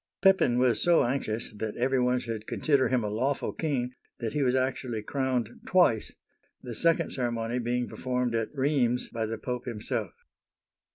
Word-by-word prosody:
Pepin 190 -11 +5
was 125 -1 +3
so 175 -1 +5
anxious 120 -3 -2
that 105 0 -4
every 130 +2 +2
one 125 0 +2
should 115 -3 -5
consider 140 -4 +2
him 125 -1 +1
a - - -1
lawful 125 +7 -1
king, 130 -6 -1 0.3
that 115 -2 -3
he 150 - 0
was 130 -1 +2
actually 130 -4 -1
crowned 130 -3 -1 0.2
twice, 155 - +3 0.5
the 125 -2 -7
second 165 +9 +2
ceremony 120 -1 -1
being 120 +1 -1
performed 125 -2 -2
at 115 -1 0
Rheims, 130 -3 +1
by 115 -1 -2
the 115 +1 -3
Pope 125 +2 -4
himself. 110 -1 -3
125 Hz, 165 wpm, -28 LUFS, 115-130 Hz, 0.5 s, Pepin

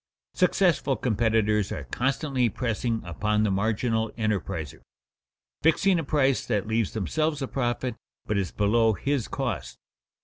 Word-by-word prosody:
Successful 180 -6 +2
competitors 110 -3 +1
are - - -4
constantly 130 -1 0
pressing 115 0 -2
upon 105 +5 0
the 105 - +2
marginal 110 +3 0
enterpriser, 95 - -2 0.8
fixing 175 +3 +3
a - - -2
price 135 -2 +2
that 105 -5 -1
leaves 110 -1 0
themselves 155 +8 -1
a 135 - -2
profit, 125 -2 -2 0.3
but 105 - -1
is 95 -4 0
below 110 +2 +3
his 135 +1 -1
cost. 90 - -3
115 Hz, 130 wpm, -26 LUFS, 105-135 Hz, 0.8 s, fixing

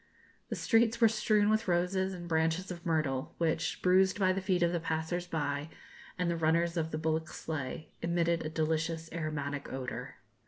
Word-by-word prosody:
The - - -2
streets 230 -1 +3
were 230 - +7
strewn 215 -1 +3
with 215 +1 +1
roses 185 +2 +1
and 175 -2 -7
branches 165 +3 +1
of 170 -1 -7
myrtle, 150 -5 0
which, 165 0 -1
bruised 190 +1 +4
by 185 -2 +3
the 195 - -2
feet 185 -2 +1
of 170 - +3
the 175 - 0
passers 165 +2 -2
by 145 -2 -2 0.5
and 180 -1 0
the 170 - +1
runners 170 +1 +2
of 160 -2 0
the 155 - -3
bullock 160 0 0
sleigh, 155 -1 -5
emitted 170 0 +1
a 155 - -3
delicious 160 +1 -1
aromatic 145 -3 -3
odour. 130 -1 -5
170 Hz, 180 wpm, -32 LUFS, 160-180 Hz, 0.5 s, were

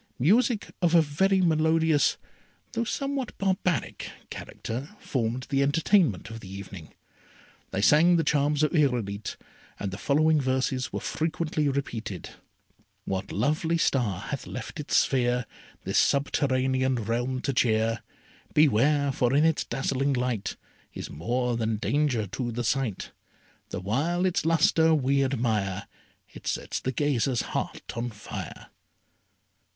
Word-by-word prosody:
Music 215 - +2
of 175 -1 +3
a 165 - +8
very 190 +6 +2
melodious, 160 -2 +3 0.5
though 230 - -1
somewhat 275 +1 -3
barbaric, 185 - -1 0.2
character, 130 - -6
formed 125 0 -2
the 135 0 +2
entertainment 145 - +2
of 115 - -7
the 95 - -11
evening. 95 -4 -9 0.7
They 100 - -2
sang 165 +7 +6
the 165 - +2
charms 150 0 +2
of 155 - +2
Irolite, 120 - 0 0.4
and 100 - -3
the 95 - -6
following 155 +5 +3
verses 130 -1 0
were - - -3
frequently 155 -1 -1
repeated: 115 -9 -4 0.7
What 95 +1 -3
lovely 155 - +1
star 120 - +1
hath - - -5
left - - -7
its - - +1
sphere 125 -1 +2 0.4
This - - +2
subterranean 130 -2 +1
realm 120 +3 -1
to 140 - -1
cheer? 115 -2 +2 0.5
Beware! 140 0 +4
for 125 0 +1
in 150 +2 +5
its 160 -1 +2
dazzling 135 +2 0
light 125 -5 -1 0.4
Is - - -6
more 120 - -1
than 115 -1 0
danger 135 -2 +1
to 120 +5 -4
the 120 +1 -3
sight. 120 -3 -1 0.6
The - - -4
while 145 - 0
its 180 -3 0
lustre 160 0 +4
we 140 -1 +2
admire 110 -7 -1 0.4
It - - -12
sets - - -2
the 130 - -2
gazer's 135 -3 +1
heart - - -4
on 120 +1 -2
fire. 105 -2 -8
135 Hz, 135 wpm, -27 LUFS, 115-155 Hz, 0.7 s, a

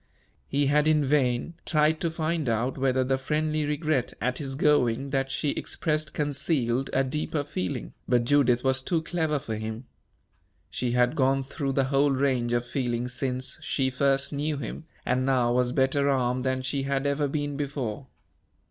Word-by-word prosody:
He 140 +1 +1
had 150 +2 +3
in 155 -2 +3
vain 130 +1 +1
tried 155 0 +2
to 170 - +1
find 160 -3 -1
out 115 +3 0
whether 130 -1 +1
the 130 +1 0
friendly 155 +2 0
regret 150 -3 -1
at 125 +3 -1
his 135 -3 -4
going 135 -3 +2
that 135 -1 0
she 140 +2 0
expressed 155 -1 -2
concealed 140 -3 0
a 135 - +2
deeper 150 +2 -2
feeling, 95 -11 -4 0.2
but 120 -1 +3
Judith 125 -3 +3
was 130 0 +2
too 160 +3 -1
clever 160 -3 0
for 135 -5 -5
him. 110 +3 -5 0.9
She 120 -1 -1
had 125 0 +3
gone 135 0 +2
through 135 0 -3
the 135 - +2
whole 140 +1 +4
range 130 -3 +1
of 120 0 +1
feeling 120 -1 -2
since 130 0 -3
she 130 -2 0
first 135 +2 +1
knew 145 +1 -1
him, 140 +4 -6 0.2
and 125 +1 +1
now 125 -3 +2
was 125 0 +2
better 135 +2 +2
armed 125 -2 +1
than 130 0 0
she 135 +2 -1
had 135 0 -1
ever 140 +1 +1
been 145 0 -2
before. 135 -4 -4
135 Hz, 175 wpm, -27 LUFS, 125-145 Hz, 0.9 s, whole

